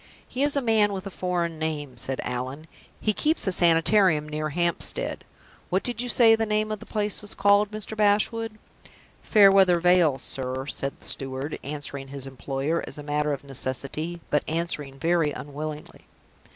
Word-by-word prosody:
"He 255 - -4
is 290 0 +2
a 280 - +1
man 215 -3 +3
with 190 0 -5
a 195 - -6
foreign 175 -3 -2
name," 150 -4 -3
said 130 +2 -1
Allan. 130 +5 -4 0.3
"He 215 - +1
keeps 310 +9 +2
a 190 - +1
Sanitarium 170 -1 +4
near 155 0 -3
Hampstead. 170 +2 -1 0.5
What 185 +2 +1
did 240 -1 0
you 245 - -2
say 230 -2 +6
the 215 -1 0
place 210 -2 -1
was 210 - -6
called, 200 +1 +4
Mr. 215 0 -4
Bashwood?" 215 +1 +1 0.6
"Fairweather 195 -4 +6
Vale, 175 -5 +4
sir," 130 0 -4
said 140 -1 -3
the - - -10
steward, 135 +2 -3
answering 140 -1 -6
his 135 -1 -6
employer, 135 +4 -2
as - - -8
a 150 - -7
matter 150 0 0
of 140 - -4
necessity, 140 +5 -4
but 150 - +3
answering 155 -4 -2
very 165 -1 +1
unwillingly. 150 +2 -7
165 Hz, 160 wpm, -25 LUFS, 145-205 Hz, 0.6 s, say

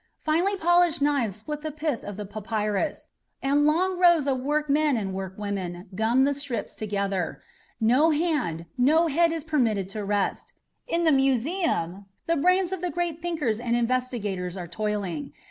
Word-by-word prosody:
Finely 340 +6 +1
polished 350 -2 +3
knives 280 -8 +1
split 300 +8 -6
the 310 - -3
pith 305 -4 -3
of 205 -1 -7
the 210 - -5
papyrus, 215 +5 -2 0.4
and 285 +2 +3
long 360 +4 +1
rows 345 -5 +5
of 265 -2 0
workmen 295 0 +1
and 195 -3 -3
workwomen 190 -1 -5
gum 225 +6 +2
the 285 +1 +2
strips 280 -4 -4
together. 200 -4 -2 0.4
No 255 +8 +4
hand, 295 - 0
no 310 +7 +4
head 335 +3 +3
is 325 -2 -3
permitted 235 - +1
to 210 +1 -5
rest. 200 0 -1 0.3
In 340 +1 0
the 320 - +4
Museum 270 - 0 0.2
the 335 - +1
brains 365 +4 +2
of 380 -2 -3
the 360 - -1
great 345 -2 -2
thinkers 310 -11 -1
and 235 0 0
investigators 230 -7 -1
are 175 -2 -5
toiling. 185 -5 -3
260 Hz, 160 wpm, -26 LUFS, 205-315 Hz, 0.4 s, rows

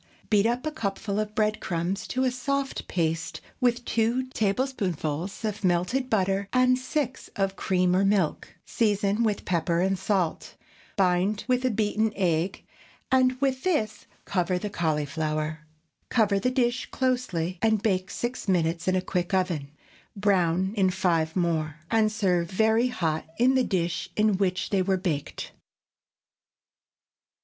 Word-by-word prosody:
Beat 210 0 +4
up 240 +4 -1
a 310 - -1
cupful 200 -6 -3
of 215 0 -3
bread 215 0 +1
crumbs 175 +3 -2
to 255 - -1
a 255 - +2
soft 275 +2 -2
paste 165 -2 -1 0.2
with 245 -2 +1
two 235 +3 +1
tablespoonfuls 195 - -2
of 210 0 -3
melted 185 +9 +1
butter 195 -1 +1
and 255 0 +4
six 260 0 -3
of 195 -1 0
cream 180 -1 +1
or 190 - +3
milk; 195 -5 0
season 205 -1 +1
with 215 -3 0
pepper 170 -1 +1
and 190 +1 +1
salt, 190 -4 -1 0.4
bind 190 +2 +1
with 250 0 +2
a - - +4
beaten 215 0 +1
egg, 175 -1 0 0.5
and 255 -1 +3
with 265 -1 0
this 260 - -1 0.2
cover 180 -1 0
the 205 +2 -4
cauliflower. 155 -1 -2 0.4
Cover 210 -4 +3
the 250 - +1
dish 250 -1 0
closely 185 -10 -1
and 220 -2 +2
bake 190 -4 +1
six 240 -1 -4
minutes 170 -2 +1
in 185 - +3
a 185 - 0
quick 180 0 -1
oven; 170 -7 -1 0.5
brown 190 -2 +2
in 190 -3 +3
five 170 -4 0
more, 160 -4 0 0.2
and 220 -1 +3
serve 180 -5 +1
very 220 +5 +3
hot 160 -11 -2
in 250 +3 +4
the 260 -1 +3
dish 180 -4 -1
in 210 -2 +3
which 185 -2 0
they 195 -2 +3
were 190 0 +1
baked. 165 -7 -3
195 Hz, 145 wpm, -26 LUFS, 180-230 Hz, 0.5 s, Beat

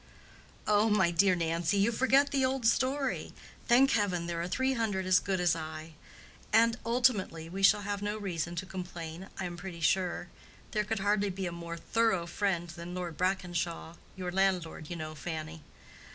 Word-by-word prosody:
"Oh, 210 +1 +3
my 190 -5 +3
dear 185 +2 +4
Nancy, 170 +2 0
you 200 +4 +3
forget 265 +4 +3
the 275 -1 +1
old 260 -2 0
story—thank 265 0 +1
Heaven, 190 -6 +1
there 170 -1 -3
are 170 - -2
three 260 +8 +1
hundred 210 -6 -1
as 185 0 +5
good 190 -1 -1
as 175 -2 +3
I. 155 0 -7 0.6
And 230 +1 +5
ultimately, 230 -9 +1
we 190 +3 -5
shall 205 +1 +5
have 205 0 -3
no 205 +1 -2
reason 175 -4 -3
to 175 - -3
complain, 180 -1 -7
I 190 - -2
am 175 -1 -5
pretty 175 -1 -8
sure. 175 +1 +1 0.4
There 210 -1 0
could 215 -1 -2
hardly 205 0 +2
be 190 0 -4
a 175 - -2
more 170 0 -6
thorough 190 -1 +1
friend 175 -1 -1
than 170 +2 -7
Lord 175 -3 -4
Brackenshaw—your 180 -1 -3
landlord, 180 -5 0
you 175 - -4
know, 155 -1 -5
Fanny. 160 +1 -6
185 Hz, 170 wpm, -31 LUFS, 170-210 Hz, 0.6 s, as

